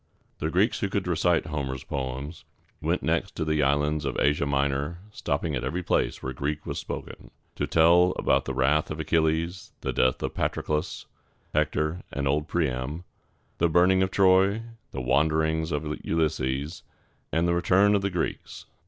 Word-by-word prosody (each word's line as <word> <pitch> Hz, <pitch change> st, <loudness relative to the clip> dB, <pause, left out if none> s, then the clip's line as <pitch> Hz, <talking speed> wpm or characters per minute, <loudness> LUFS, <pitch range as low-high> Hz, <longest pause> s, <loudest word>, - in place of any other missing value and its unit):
] -, -, -40 dB
The 80 Hz, -, -1 dB
Greeks 95 Hz, +7 st, +2 dB
who 100 Hz, -, -1 dB
could 100 Hz, -1 st, -1 dB
recite 85 Hz, -1 st, +2 dB
Homer's 70 Hz, -4 st, -4 dB
poems 70 Hz, +3 st, -5 dB, 0.4 s
went -, -, 0 dB
next -, -, 0 dB
to 80 Hz, -, -2 dB
the 75 Hz, -1 st, +1 dB
islands 75 Hz, +2 st, +1 dB
and -, -, -2 dB
Asia 75 Hz, 0 st, +2 dB
Minor, 70 Hz, +3 st, 0 dB
stopping 75 Hz, -3 st, -2 dB
at 65 Hz, -, -3 dB
every 90 Hz, +2 st, -2 dB
place -, -, 0 dB
where 65 Hz, -, -3 dB
Greek 75 Hz, +4 st, -3 dB
was -, -, -3 dB
spoken, -, -, -7 dB, 0.3 s
to -, -, -2 dB
tell 85 Hz, +3 st, +5 dB
about -, -, +2 dB
the 65 Hz, -, -3 dB
wrath 70 Hz, +4 st, +2 dB
of 75 Hz, -, -5 dB
Achilles, 80 Hz, +2 st, 0 dB
the -, -, -2 dB
death 65 Hz, -, +2 dB
of -, -, -2 dB
Patroclus, 75 Hz, 0 st, -2 dB, 0.5 s
Hector, 75 Hz, +2 st, 0 dB
or 70 Hz, -1 st, -1 dB
old 75 Hz, +2 st, +1 dB
Priam, 75 Hz, 0 st, -2 dB, 0.6 s
the 85 Hz, -, +3 dB
burning 90 Hz, +3 st, +4 dB
of 95 Hz, -, +2 dB
Troy, 95 Hz, +3 st, +4 dB, 0.3 s
the 65 Hz, -, -5 dB
wanderings 80 Hz, +5 st, +1 dB
of 75 Hz, 0 st, -2 dB, 0.2 s
Ulysses, 75 Hz, -1 st, -1 dB, 0.5 s
and 80 Hz, +2 st, +1 dB
the 85 Hz, -, +2 dB
return 95 Hz, +4 st, +4 dB
of 100 Hz, -, +3 dB
the 100 Hz, -, 0 dB
Greeks. 90 Hz, -3 st, -4 dB
80 Hz, 170 wpm, -26 LUFS, 70-85 Hz, 0.6 s, tell